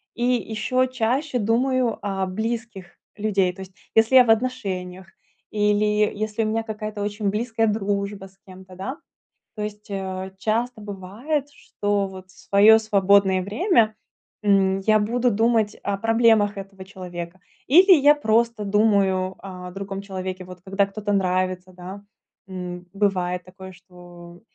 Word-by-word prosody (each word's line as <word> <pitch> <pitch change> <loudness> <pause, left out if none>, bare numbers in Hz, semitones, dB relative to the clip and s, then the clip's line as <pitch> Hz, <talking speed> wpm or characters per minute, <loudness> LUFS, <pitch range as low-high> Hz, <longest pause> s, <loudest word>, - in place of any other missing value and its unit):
и 240 - -3
ещё 250 +1 0
чаще 255 +2 -1
думаю 240 +2 +1
о 195 -2 -2
близких 220 -1 -5 0.2
людей. 200 -4 0
То 190 - -11
есть, 190 0 -10 0.2
если 225 +4 +4
я 255 - +9
в 225 - -3
отношениях 190 -7 -1 0.4
или 210 0 +2 0.3
если 215 +1 -2
у - - -1
меня 225 +1 -1
какая-то 215 -1 -6
очень 205 0 -2
близкая 225 +1 0
дружба 200 -1 -2
с 190 0 -18
кем-то, 185 0 -13
да. 250 +10 -5 0.6
То 210 - -6
есть, 210 +1 -7
э, 190 -1 -4
часто 225 +2 -1
бывает, 210 +10 -4
что 205 -7 -2
вот 185 -1 -11
в - - -18
своё 210 +3 +6
свободное 200 -3 +3
время, 220 - +2 0.5
м, 195 -1 +3
я 215 +2 +3
буду 240 +3 +1
думать 225 0 +1
о 200 -1 -1
проблемах 225 -2 +3
этого 195 -1 -9
человека, 180 -2 -8 0.3
или 365 - +7
я 295 -1 +6
просто 230 -4 +1
думаю 195 -3 +2
о 180 -2 -9
другом 195 +1 -6
человеке, 185 -1 -6
вот, 180 0 -11
когда 195 +1 +1
кто-то 205 +1 -3
нравится, 185 -1 0
да. 185 +3 -9 0.5
М, 180 -1 -6
бывает 180 -3 0
такое, 190 +1 -11
что 175 -1 -15
205 Hz, 145 wpm, -23 LUFS, 190-225 Hz, 0.6 s, я